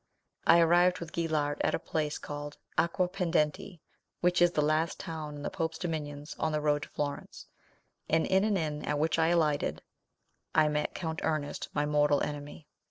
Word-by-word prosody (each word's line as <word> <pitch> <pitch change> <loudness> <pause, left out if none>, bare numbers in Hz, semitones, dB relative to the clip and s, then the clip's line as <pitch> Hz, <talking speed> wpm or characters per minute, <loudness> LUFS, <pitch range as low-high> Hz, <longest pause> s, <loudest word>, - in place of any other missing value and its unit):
I 170 - +8
arrived 175 +2 +4
with 170 -2 -7
Guillart 155 -3 0
at - - +2
a - - 0
place 150 -1 -2
called 145 0 -7 0.2
Aquapendente, 170 -1 0 0.4
which 180 0 +2
is 175 0 +5
the 150 - +2
last 155 +2 +1
town 155 -2 -5
in 145 - -8
the - - -3
pope's 160 -1 -2
dominions 150 -4 -4
on 160 - 0
the 150 - 0
road 150 -1 +1
to - - -7
Florence, 145 -1 -5 0.6
and 160 +1 +3
in 190 +1 +3
an 210 -2 +2
inn 150 -3 -2
at 150 - -1
which 160 +2 +1
I 160 - +4
alighted, 160 -4 +1 0.7
I 155 -1 +5
met 150 0 -1
Count 160 -2 -3
Ernest, 155 -2 -2
my 145 0 +2
mortal 150 -1 +3
enemy. 145 +1 -6
155 Hz, 175 wpm, -30 LUFS, 150-170 Hz, 0.7 s, I